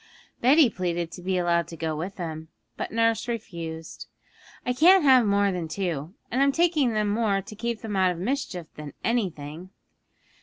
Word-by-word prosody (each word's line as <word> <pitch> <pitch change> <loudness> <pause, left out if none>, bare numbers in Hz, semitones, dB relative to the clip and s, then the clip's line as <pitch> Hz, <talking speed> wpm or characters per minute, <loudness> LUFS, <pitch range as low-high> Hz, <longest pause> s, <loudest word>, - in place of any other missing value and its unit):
Betty 275 +4 +6
pleaded 175 -5 -3
to 180 - -9
be 185 +1 -1
allowed 170 -2 +1
to 165 - -9
go 160 -1 -2
with 180 +6 -5
them, 160 -3 -6 0.3
but - - -5
nurse 230 0 +1
refused. 165 -8 -6 0.6
'I 250 - +1
can't 350 +7 +6
have 260 -5 +6
more 200 0 +3
than 175 -3 -3
two; 165 -1 -3 0.2
and 255 - +1
I'm 280 0 +4
taking 310 -6 +2
them 210 -1 +1
more 205 -1 +1
to 215 - -10
keep 235 +1 -3
them 215 -2 -4
out 190 -1 +3
of 180 - -3
mischief 190 - -3
than 150 -2 -9
anything. 180 -7 -2
195 Hz, 180 wpm, -26 LUFS, 170-235 Hz, 0.6 s, Betty